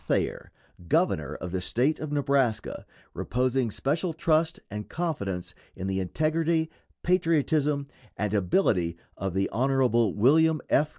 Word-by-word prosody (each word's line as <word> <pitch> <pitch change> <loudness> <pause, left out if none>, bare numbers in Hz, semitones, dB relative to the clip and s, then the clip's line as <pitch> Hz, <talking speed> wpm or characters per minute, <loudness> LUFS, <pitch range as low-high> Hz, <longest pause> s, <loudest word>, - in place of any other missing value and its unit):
Thayer, - - -1 0.4
governor - - +1
of 90 - -6
the 95 0 -2
State 130 - +1
of 155 -1 -5
Nebraska, 135 -6 0 0.3
reposing 125 -1 0
special 160 - -1
trust 160 +1 +1
and 105 0 -6
confidence 100 - -3 0.2
in 95 - -5
the 95 0 -1
integrity, 160 - 0 0.3
patriotism, 155 -5 +2 0.3
and 105 0 -1
ability 90 - +2 0.2
of 95 -2 -4
the 95 0 +2
Hon. 120 -3 +2
William 155 +8 +4
F. 150 +2 +3
135 Hz, 125 wpm, -27 LUFS, 100-160 Hz, 0.4 s, William